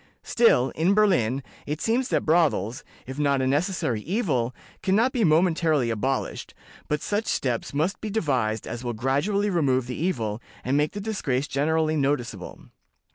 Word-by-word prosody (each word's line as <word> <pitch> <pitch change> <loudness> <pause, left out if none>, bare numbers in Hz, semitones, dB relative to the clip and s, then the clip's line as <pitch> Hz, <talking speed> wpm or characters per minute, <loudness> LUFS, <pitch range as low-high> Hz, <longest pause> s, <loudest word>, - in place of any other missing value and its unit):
Still, 135 - +3
in 175 +5 +1
Berlin, 140 - +2 0.2
it 150 +1 -3
seems 245 +6 0
that - - 0
brothels, 155 - +1 0.2
if 130 +3 -7
not 140 -2 +2
a 130 - 0
necessary 145 - 0
evil, 145 - 0 0.3
can 190 0 +1
not 235 +5 +3
be 245 -3 0
momentarily 160 - +3
abolished, 130 +4 -3 0.3
but 150 0 -1
such 210 +2 -1
steps 125 -4 -1
must 160 +8 -1
be 215 - -4
devised 130 - 0
as 120 - -6
will 120 -1 -2
gradually 145 - 0
remove 135 -8 +1
the 125 - -5
evil, 115 - -1 0.2
and 130 +3 0
make 150 +1 +1
the 205 - -5
disgrace 145 -11 -1
generally 155 +2 +1
noticeable. 125 -9 -2
150 Hz, 160 wpm, -25 LUFS, 125-185 Hz, 0.3 s, Still